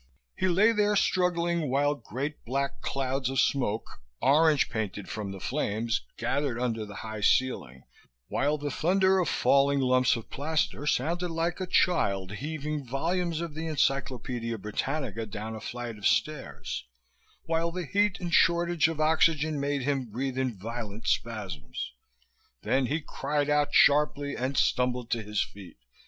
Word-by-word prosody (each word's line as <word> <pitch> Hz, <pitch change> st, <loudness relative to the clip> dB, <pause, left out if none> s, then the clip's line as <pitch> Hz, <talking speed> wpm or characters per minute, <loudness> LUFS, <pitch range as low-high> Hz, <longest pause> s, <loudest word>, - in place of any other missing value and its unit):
He 185 Hz, -, +1 dB
lay 195 Hz, +6 st, +5 dB
there, 210 Hz, -1 st, +2 dB
struggling, 170 Hz, -5 st, +1 dB
while 145 Hz, +2 st, +2 dB
great 140 Hz, +3 st, -5 dB
black 140 Hz, +3 st, -2 dB
clouds 135 Hz, -1 st, -1 dB
of 135 Hz, -, 0 dB
smoke, 110 Hz, -, 0 dB, 0.2 s
orange 150 Hz, +3 st, +4 dB
painted 105 Hz, -3 st, -4 dB
from 105 Hz, -2 st, -4 dB
the 95 Hz, -, -7 dB
flames, 115 Hz, -1 st, -1 dB, 0.2 s
gathered 140 Hz, -5 st, -1 dB
under 115 Hz, -3 st, -1 dB
the 105 Hz, -, -9 dB
high 110 Hz, -1 st, -5 dB
ceiling, 100 Hz, -, +1 dB, 0.4 s
while 145 Hz, -, +1 dB
the 145 Hz, -1 st, -4 dB
thunder 190 Hz, +5 st, +3 dB
of 175 Hz, -, +1 dB
falling 140 Hz, 0 st, +3 dB
lumps 130 Hz, -1 st, +3 dB
of 115 Hz, -, -7 dB
plaster 150 Hz, 0 st, -1 dB
sounded 170 Hz, +7 st, 0 dB
like 165 Hz, +2 st, -1 dB
a 185 Hz, -, -2 dB
child 100 Hz, -, +2 dB
heaving 150 Hz, +5 st, -4 dB
volumes 165 Hz, +6 st, -1 dB
of 170 Hz, -3 st, -4 dB
the 160 Hz, +2 st, -4 dB
Encyclopedia 125 Hz, -5 st, -1 dB
Britannica 115 Hz, +3 st, -3 dB
down 110 Hz, +2 st, -5 dB
a 110 Hz, -, -8 dB
flight 120 Hz, -3 st, -6 dB
of 100 Hz, -, +2 dB
stairs, 155 Hz, -3 st, -1 dB, 0.6 s
while 165 Hz, +1 st, 0 dB
the 180 Hz, 0 st, -4 dB
heat 205 Hz, +6 st, +1 dB
and 175 Hz, -2 st, -4 dB
shortage 170 Hz, -1 st, +4 dB
of 165 Hz, -2 st, -4 dB
oxygen 155 Hz, -1 st, +3 dB
made 140 Hz, -1 st, -1 dB
him 135 Hz, -1 st, 0 dB
breathe 130 Hz, +4 st, -3 dB
in 130 Hz, -5 st, -1 dB
violent 110 Hz, +1 st, -6 dB
spasms. 105 Hz, -, -3 dB, 0.7 s
Then 130 Hz, -1 st, +2 dB
he 155 Hz, +5 st, -1 dB
cried 145 Hz, 0 st, -1 dB
out 150 Hz, 0 st, +2 dB
sharply 145 Hz, -1 st, +4 dB
and 130 Hz, +2 st, -2 dB
stumbled 125 Hz, -1 st, +1 dB
to 115 Hz, -, +1 dB
his 105 Hz, 0 st, 0 dB
feet. 95 Hz, -8 st, -12 dB
140 Hz, 150 wpm, -28 LUFS, 115-160 Hz, 0.7 s, lay